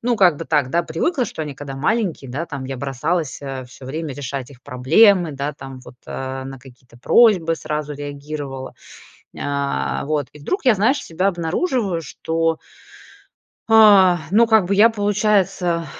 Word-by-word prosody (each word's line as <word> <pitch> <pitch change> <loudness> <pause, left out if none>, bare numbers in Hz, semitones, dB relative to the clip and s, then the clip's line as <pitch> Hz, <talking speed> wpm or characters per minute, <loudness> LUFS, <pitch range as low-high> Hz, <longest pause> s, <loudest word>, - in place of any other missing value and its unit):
ну, 240 0 0
как 180 -6 +4
бы 165 - -6
так, 145 -5 +1
да, 170 +4 +1
привыкла, 245 - -1
что 155 - -6
они, 150 -2 -6
когда 135 0 -8
маленькие, 165 - -1
да, 155 +7 -4
там 140 -3 -6
я 130 -1 -6
бросалась, 140 +2 -2
э, 135 -2 -6
всё 130 - -14
время 150 +1 -5
решать 135 -2 -6
их 130 -3 -17
проблемы, 165 - +3
да, 140 +2 -3
там, 135 -2 -10
вот, 125 0 -14
э, 130 0 -5
на 135 0 -8
какие-то 125 -1 -18
просьбы 180 - +4
сразу 150 -2 -4
реагировала, 145 -2 -7 0.6
нь - - -14
э, 105 - -2
вот, 150 -3 -1
и 150 - -14
вдруг 370 - -3
я, 250 -4 +5
знаешь, 250 +9 +2
себя 185 +4 0
обнаруживаю, 185 - -1
что 165 +2 -2 1.1
А, 200 -5 +7
ну 225 +4 +5
как 220 -3 +4
бы 195 +3 0
я 215 +3 +6
получается, 205 -5 0
155 Hz, 170 wpm, -20 LUFS, 135-195 Hz, 1.1 s, А